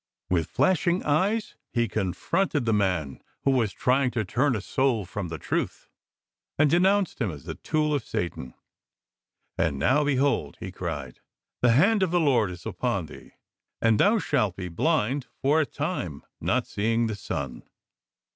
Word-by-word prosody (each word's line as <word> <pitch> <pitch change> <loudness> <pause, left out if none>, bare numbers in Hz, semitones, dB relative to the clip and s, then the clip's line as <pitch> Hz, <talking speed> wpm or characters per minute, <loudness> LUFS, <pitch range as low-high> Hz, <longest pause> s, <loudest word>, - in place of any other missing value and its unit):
With 85 -3 +2
flashing 175 +4 +2
eyes 195 +9 +1 0.2
he 120 -1 +1
confronted 115 - -1
the 115 - +2
man 90 -9 0 0.2
who 135 - +3
was 120 -6 +2
trying 130 +6 +2
to 110 - +1
turn 125 +7 +1
a 105 - -2
soul 120 -2 0
from 90 +1 -5
the 80 -1 -5
truth, - - -3 0.7
and 145 -1 +4
denounced 190 -1 +2
him 110 - +1
as 75 -5 -8
the - - -5
tool 150 -1 0
of 140 -5 0
batan. 80 -7 -3 1.0
"And 80 -5 +1
now 130 - +3
behold," 140 -1 +1
he 95 - -6
cried, 75 -9 -5 0.4
"the 120 -2 +5
Hand 200 - +4
of 190 - +2
the 175 +1 +2
Lord 125 - +3
is 90 -1 -9
upon - - -1
thee, - - -13 0.5
and 110 -2 +3
thou 215 +3 +5
shalt 105 - 0
be 90 -2 -5
blind 135 - 0
for 150 +4 +3
a 150 - -1
time, 140 - -4 0.2
not - - +1
seeing 115 +3 0
the 110 -2 -2
sun." 100 - -5
120 Hz, 165 wpm, -26 LUFS, 95-150 Hz, 1.0 s, the